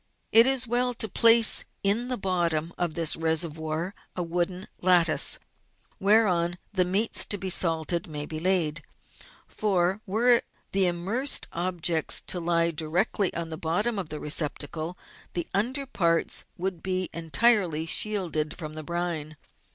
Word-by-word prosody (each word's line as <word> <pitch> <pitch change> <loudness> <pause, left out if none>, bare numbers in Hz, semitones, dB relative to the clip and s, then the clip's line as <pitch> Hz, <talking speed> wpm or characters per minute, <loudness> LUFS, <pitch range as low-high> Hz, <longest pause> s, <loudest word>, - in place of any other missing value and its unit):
It 230 +2 +7
is 265 -1 +3
well 245 +1 0
to 220 - -1
place 230 +2 +6 0.2
in 210 +5 +2
the 250 -1 -1
bottom 170 -4 -1
of 175 -3 -3
this 165 -2 +2
reservoir 160 +1 -2 0.2
a 180 - -2
wooden 175 +2 -2 0.2
lattice, 175 -3 +4 0.6
whereon 185 -4 +2 0.2
the 185 -2 +2
meats 200 +5 +1
to 205 - -3
be 190 -1 -3
salted 170 0 +1
may 150 -2 -5
be 155 +1 -6
laid, 165 -4 +1 0.7
for, 190 -1 0
were 235 +5 +3 0.3
the 195 -1 +3
immersed 195 +11 0
objects 170 -2 +1
to 180 - -2
lie 170 0 +1
directly 165 +4 0
on 170 -1 -4
the 160 - -5
bottom 200 +8 -1
of 180 - -5
the 150 - -5
receptacle, 155 +3 -2 0.4
the 175 - -2
under 255 +8 -1
parts 170 -10 0
would 180 -2 -4
be 185 -1 -1
entirely 170 -1 +2
shielded 170 -5 -1
from 155 -2 -7
the 155 - -6
brine. 160 -2 -4
175 Hz, 145 wpm, -26 LUFS, 165-200 Hz, 0.7 s, It